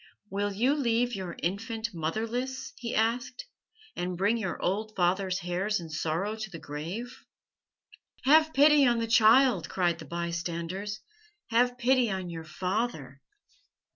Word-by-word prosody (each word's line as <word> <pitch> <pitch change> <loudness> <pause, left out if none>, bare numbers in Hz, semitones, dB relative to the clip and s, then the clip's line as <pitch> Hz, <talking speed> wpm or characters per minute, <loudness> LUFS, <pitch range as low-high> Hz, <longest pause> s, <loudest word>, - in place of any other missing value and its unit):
'Will 205 +1 -1
you 240 +8 +2
leave 245 -4 +1
your 185 -4 -5
infant 220 +5 -2
motherless?' 230 +11 -3
he 235 -1 -4
asked, 240 - 0 0.5
'and 180 0 -3
bring 200 +5 +2
your 200 -7 -3
old 215 +4 -2
father's 185 +1 +1
hairs 185 +4 -1
in 165 -2 -9
sorrow 165 +7 -1
to 215 -2 -6
the 175 - -8
grave?' 170 - -6 1.0
"'Have 310 +3 +5
pity 295 0 +6
on 240 -2 +4
the 230 - 0
child!' 225 -2 +5
cried 175 -2 0
the - - -8
bystanders. 170 +4 -4 0.5
'Have 245 +2 +3
pity 255 -1 +3
on 190 -3 -3
your 165 -1 -7
father!' 175 - -3
210 Hz, 140 wpm, -29 LUFS, 175-240 Hz, 1.0 s, pity